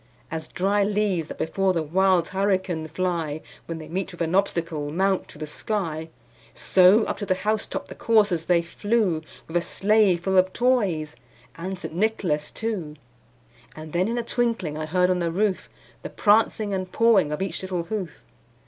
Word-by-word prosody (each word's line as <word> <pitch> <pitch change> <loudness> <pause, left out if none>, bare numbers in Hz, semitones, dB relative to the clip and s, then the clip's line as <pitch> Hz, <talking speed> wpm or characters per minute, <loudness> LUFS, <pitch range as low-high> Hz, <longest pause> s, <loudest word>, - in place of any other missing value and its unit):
As 160 -1 -4
dry 200 +3 +1
leaves 200 -5 0
that - - -8
before 190 +3 0
the 165 -3 0
wild 180 +2 +2
hurricane 190 -4 0
fly, 165 -2 -2 0.3
When 165 - -4
they 155 -1 -9
meet 190 +4 -3
with 175 - -10
an 165 +1 0
obstacle, 165 -6 0
mount 190 +4 0
to - - -13
the 155 - -5
sky, 160 -2 -3 0.5
So, 190 +4 +5
up - - -3
to 205 - -4
the 185 - +2
house 215 +3 -1
top - - -5
the - - -8
coursers 205 -8 +2
they 170 -1 +3
flew, 200 -1 0 0.3
With 165 - -1
a - - +2
sleigh 205 0 +3
full 190 +2 +2
of 185 0 +1
toys 200 -12 +1 0.4
and 185 +3 -5
St. 180 - -7
Nicholas 175 -6 0
too. 195 -10 -4 0.8
And 155 0 -9
then 180 +3 +2
in 235 +2 -2
a 240 - -1
twinkling 230 -10 -1
I 155 0 -4
heard 180 +2 +2
on 180 - +1
the 170 -1 0
roof, 195 +2 0 0.3
The - - -6
prancing 215 -1 +2
and 185 -1 -3
pawing 220 -9 +4
of 150 - -2
each 195 - -4
little 185 -2 -3
hoof. 180 - -5
185 Hz, 185 wpm, -24 LUFS, 165-205 Hz, 0.8 s, So